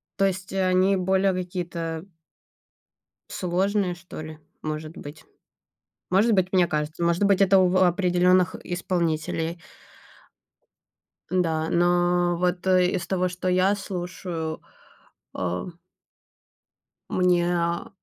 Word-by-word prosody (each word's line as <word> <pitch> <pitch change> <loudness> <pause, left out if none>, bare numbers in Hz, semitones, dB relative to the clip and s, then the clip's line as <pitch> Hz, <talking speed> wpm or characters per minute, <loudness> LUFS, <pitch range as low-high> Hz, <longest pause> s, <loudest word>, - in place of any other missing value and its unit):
То 195 - +2
есть, 190 -1 -3
они 185 0 +3
более 190 +1 +2
какие-то 175 -2 -4 1.2
сложные 185 +1 0
что 175 -1 -10
ли, 155 0 -9 0.2
может 155 +1 -5
быть. 145 +2 -10 0.9
Может 205 +5 +3
быть, 185 -2 +1
мне 180 -2 +4
кажется, 155 +1 -3
может 170 +3 +2
быть, 200 -1 +3
это 195 0 +5
у 185 -1 +4
в 180 - 0
определенных 180 0 +3
исполнителей. 170 -2 -2 1.7
Да, 165 -3 0
но 175 0 +2
вот 180 +1 -1
из 180 -1 +2
того, 185 -1 0
что 180 +1 -4
я 185 +2 +3
слушаю, 175 -4 -5 0.7
а 90 -1 -3 1.5
мне, 180 -1 +2
а, 170 0 -1
180 Hz, 105 wpm, -25 LUFS, 170-185 Hz, 1.7 s, это